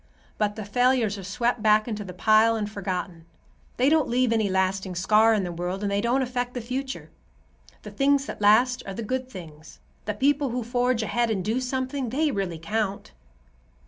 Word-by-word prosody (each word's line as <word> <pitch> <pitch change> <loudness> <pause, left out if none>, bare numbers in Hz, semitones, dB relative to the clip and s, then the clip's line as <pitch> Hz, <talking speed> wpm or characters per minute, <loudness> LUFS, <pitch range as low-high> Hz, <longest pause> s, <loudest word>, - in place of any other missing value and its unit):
But 210 -1 0
the 215 - -6
failures 235 -1 +1
are - - -8
swept 235 +5 -1
back 215 +1 +4
into 215 -3 -4
the 185 - -8
pile 215 +5 +4
and 215 -2 -2
forgotten. 185 -4 -5 0.5
They 255 - +3
don't 310 0 +3
leave 245 -1 +2
any 220 -3 +1
lasting 190 0 -1
scar 215 +5 +4
in 205 - 0
the 175 - -3
world, 180 +3 -4
and 200 - -1
they 200 0 +1
don't 245 +4 +1
affect 245 0 -3
the - - -2
future. 260 +3 -5 0.7
The - - -8
things 275 0 +2
that - - -7
last 240 +5 +4
are 195 - -5
the 230 - -4
good 255 +3 -3
things. 160 -7 -11 0.3
The 210 0 -2
people 280 +3 +1
who 245 0 -3
forge 245 0 0
ahead 235 +2 0
and 195 -5 -2
do 225 +4 0
something, 260 0 -2
they 295 +5 +1
really 190 -7 -3
count." 200 - -3
220 Hz, 195 wpm, -25 LUFS, 195-250 Hz, 0.7 s, back